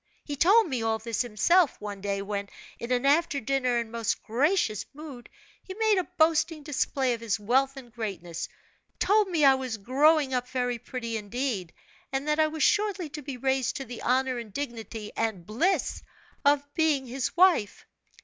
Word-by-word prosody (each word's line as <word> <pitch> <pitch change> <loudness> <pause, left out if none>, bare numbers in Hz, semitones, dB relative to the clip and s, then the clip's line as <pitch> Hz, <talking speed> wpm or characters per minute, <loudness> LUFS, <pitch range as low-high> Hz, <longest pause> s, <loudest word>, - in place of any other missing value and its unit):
He 290 - -5
told 400 +9 +5
me 260 -6 -2
all 225 0 +1
this 225 0 -2
himself, 255 - +2
one 205 -2 -6
day 200 0 -2
when, 200 0 -4 0.3
in 235 - -5
an 250 +1 +1
after 290 0 +3
dinner 255 0 0
and 230 -1 -3
most 230 -1 -2
gracious 250 - +1
mood, 285 -5 -10 0.3
he 375 - -9
made 435 -2 +3
a 365 - -4
boasting 320 -1 +2
display 270 -3 0
of 230 - -6
his 225 -2 -1
wealth 265 +6 +1
and 240 -4 -11
greatness; 190 -7 -5 0.5
told 420 0 +3
me 330 -6 +2
I 270 - +8
was 260 -4 -3
growing 275 +6 +3
up 250 0 -1
very 245 -2 -1
pretty 235 -2 -4
indeed, 210 -4 -3 0.4
and 270 +2 -2
that 300 +1 +1
I 310 - +5
was 310 -1 -2
shortly 405 -4 +1
to 300 +1 -7
be 275 -2 -6
raised 265 0 0
to 270 - -5
the 245 -1 -8
honor 255 0 +1
and 230 -3 -9
dignity, 225 -4 -6
and 220 -6 -2
bliss 255 - 0 0.4
of 285 0 +4
being 305 -4 +2
his 255 +6 -3
wife. 350 - +3
260 Hz, 180 wpm, -27 LUFS, 225-300 Hz, 0.5 s, I